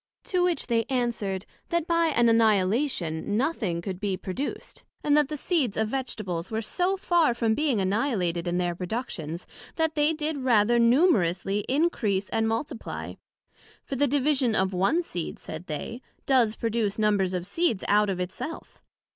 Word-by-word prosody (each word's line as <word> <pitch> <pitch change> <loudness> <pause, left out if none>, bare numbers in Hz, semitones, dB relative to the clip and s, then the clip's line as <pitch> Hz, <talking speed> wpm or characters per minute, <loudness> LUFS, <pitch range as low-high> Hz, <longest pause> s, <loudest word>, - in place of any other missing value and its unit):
To 360 -2 0
which 355 -2 +1
they 230 -2 +1
answered, 235 -7 -1 0.2
That 340 -2 0
by 335 -1 +2
an 240 -6 +3
Annihilation, 210 - +2
nothing 220 - -1
could 185 -1 -4
be 200 -2 -1
produced, 195 +9 -5 0.2
and 295 -1 +3
that 300 -2 +3
the 305 - -3
seeds 280 - 0
of 220 0 +1
Vegetables 215 -9 -3
were 220 0 -2
so 365 - 0
far 340 -9 +2
from 230 -2 +1
being 275 -3 +1
annihilated 190 -4 0
in 175 0 0
their 175 -1 0
productions, 175 - -5 0.3
that 320 -1 +1
they 300 0 +3
did 305 -1 -2
rather 240 -2 +3
numerously 210 - +3
increase 250 - +1
and 225 0 +1
multiply; 225 +2 -4 0.7
for 275 - -5
the 285 +2 +2
division 270 -3 +2
of 190 -1 +1
one 195 - +2
seed, 175 - -5
said 175 +3 -8
they, 230 - -5 0.2
does 240 -5 +3
produce 225 -3 -1
numbers 205 -4 +2
of 180 -1 -3
seeds 230 - 0
out 210 0 +4
of 185 -2 -2
it 180 0 -2
self. 305 +6 -8
225 Hz, 165 wpm, -26 LUFS, 190-285 Hz, 0.7 s, out